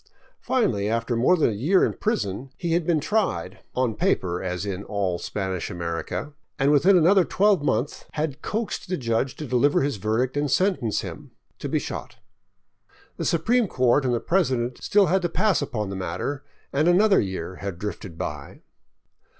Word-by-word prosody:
Finally, 105 Hz, -, 0 dB
after 115 Hz, +2 st, 0 dB
more 130 Hz, +11 st, +4 dB
than 150 Hz, -, +3 dB
a -, -, -3 dB
year 155 Hz, -, +3 dB
in -, -, -1 dB
prison, 135 Hz, -, -2 dB
he 170 Hz, -, -2 dB
had 170 Hz, -1 st, 0 dB
been 165 Hz, -3 st, +3 dB
tried 185 Hz, -, -1 dB
— -, -, -42 dB
on 125 Hz, -3 st, +1 dB
paper, 90 Hz, -4 st, 0 dB
as 90 Hz, +1 st, -3 dB
in 100 Hz, -1 st, -4 dB
all 95 Hz, -5 st, -2 dB
Spanish 95 Hz, -3 st, -3 dB
America 85 Hz, -, -4 dB
— -, -, -52 dB
and 140 Hz, +1 st, +3 dB
within 180 Hz, +7 st, +5 dB
another 180 Hz, +3 st, +5 dB
twelve 200 Hz, -1 st, +2 dB
month 130 Hz, -1 st, -1 dB
had 150 Hz, -2 st, -3 dB
coaxed 220 Hz, -4 st, -3 dB
the 185 Hz, -, 0 dB
judge 120 Hz, +1 st, -1 dB
to 155 Hz, -, -6 dB
deliver 135 Hz, +3 st, +2 dB
his 140 Hz, -5 st, -1 dB
verdict 110 Hz, +6 st, 0 dB
and 145 Hz, 0 st, 0 dB
sentence 135 Hz, -, +1 dB
him -, -, -8 dB, 0.2 s
— -, -, -44 dB
to -, -, -4 dB
be -, -, +1 dB
shot. -, -, -5 dB, 1.0 s
The -, -, -3 dB
supreme 225 Hz, +8 st, +2 dB
court 130 Hz, -1 st, +2 dB
and 130 Hz, -, +1 dB
the -, -, 0 dB
president 130 Hz, -9 st, 0 dB
had -, -, -16 dB
still 205 Hz, -2 st, +4 dB
to 175 Hz, -2 st, -1 dB
pass 190 Hz, 0 st, +2 dB
upon 110 Hz, -8 st, -3 dB
the -, -, -4 dB
matter, 95 Hz, +10 st, -3 dB, 0.3 s
and 150 Hz, +4 st, +2 dB
another 195 Hz, +4 st, +5 dB
year 95 Hz, -2 st, -3 dB
had 100 Hz, -4 st, -5 dB
drifted 100 Hz, -3 st, -6 dB
by. -, -, -6 dB
130 Hz, 185 wpm, -24 LUFS, -, 1.0 s, within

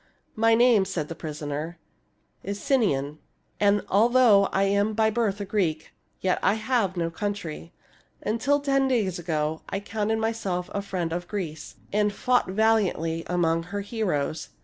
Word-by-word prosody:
My 225 Hz, +1 st, +4 dB
name," 235 Hz, -3 st, +5 dB
said 155 Hz, -5 st, -3 dB
the -, -, -4 dB
prisoner, 155 Hz, +1 st, -5 dB, 0.7 s
'■' -, -, -5 dB
is 200 Hz, 0 st, -3 dB
Sinon, 155 Hz, -, 0 dB, 0.4 s
and 205 Hz, 0 st, +3 dB
although 225 Hz, -1 st, +5 dB
I 195 Hz, 0 st, 0 dB
am 200 Hz, +2 st, +1 dB
by 220 Hz, 0 st, +3 dB
birth 215 Hz, -3 st, 0 dB
a 200 Hz, -, -3 dB
Greek, 175 Hz, -6 st, -1 dB, 0.3 s
yet 185 Hz, -1 st, +1 dB
I 200 Hz, -, +3 dB
have 220 Hz, -4 st, 0 dB
no 165 Hz, -1 st, -1 dB
country. 170 Hz, -4 st, -5 dB, 0.5 s
Until 250 Hz, +7 st, +1 dB
ten 275 Hz, -1 st, +2 dB
days 210 Hz, -9 st, 0 dB
ago 160 Hz, -2 st, -2 dB
I 195 Hz, -, -2 dB
counted 215 Hz, +1 st, -2 dB
myself 220 Hz, -5 st, -2 dB
a 200 Hz, -, -1 dB
friend 185 Hz, -4 st, -3 dB
of 175 Hz, +1 st, -4 dB
Greece, 165 Hz, -7 st, -5 dB, 0.2 s
aiid 210 Hz, 0 st, +2 dB
fought 250 Hz, 0 st, +1 dB
valiantly 190 Hz, -6 st, +1 dB
among 165 Hz, -2 st, +1 dB
her 200 Hz, +3 st, -4 dB
heroes. 185 Hz, -, -2 dB
200 Hz, 155 wpm, -26 LUFS, 165-220 Hz, 0.7 s, name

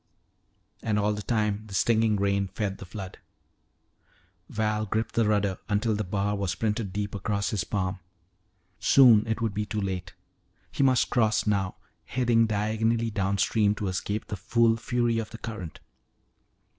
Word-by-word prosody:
And 110 Hz, -2 st, 0 dB
all 105 Hz, 0 st, +1 dB
the 105 Hz, -, -4 dB
time 105 Hz, -2 st, -1 dB
the 100 Hz, -, -7 dB
stinging 110 Hz, 0 st, +3 dB
rain 100 Hz, 0 st, +1 dB
fed 100 Hz, 0 st, -4 dB
the 95 Hz, -, -9 dB
flood. 95 Hz, 0 st, -8 dB, 1.3 s
Val 105 Hz, 0 st, -1 dB
gripped 110 Hz, +3 st, -2 dB
the 115 Hz, -2 st, +2 dB
rudder 100 Hz, -3 st, +1 dB
until 105 Hz, +2 st, +1 dB
the 105 Hz, +1 st, -1 dB
bar 100 Hz, +2 st, -1 dB
was 100 Hz, -2 st, -2 dB
printed 105 Hz, -2 st, -1 dB
deep 100 Hz, +1 st, -3 dB
across 100 Hz, 0 st, -1 dB
his 105 Hz, -4 st, -1 dB
palm. 95 Hz, -2 st, -2 dB, 0.8 s
Soon 120 Hz, -5 st, +6 dB
it 110 Hz, 0 st, -2 dB
would 115 Hz, -3 st, 0 dB
be 105 Hz, +1 st, -2 dB
too 105 Hz, -, -2 dB
late. 95 Hz, -4 st, -4 dB, 0.6 s
He -, -, -2 dB
must 130 Hz, -3 st, +3 dB
cross 110 Hz, -3 st, +2 dB
now, 100 Hz, -3 st, 0 dB, 0.3 s
heading 120 Hz, -2 st, +2 dB
diagonally 110 Hz, +2 st, 0 dB
downstream 100 Hz, +1 st, +1 dB
to 105 Hz, -2 st, -3 dB
escape 100 Hz, +3 st, -3 dB
the 105 Hz, -, -5 dB
full 115 Hz, +4 st, +2 dB
fury 120 Hz, 0 st, 0 dB
of 110 Hz, -, -4 dB
the 115 Hz, -, -9 dB
current. 110 Hz, -9 st, -7 dB
105 Hz, 155 wpm, -27 LUFS, 100-115 Hz, 1.3 s, Soon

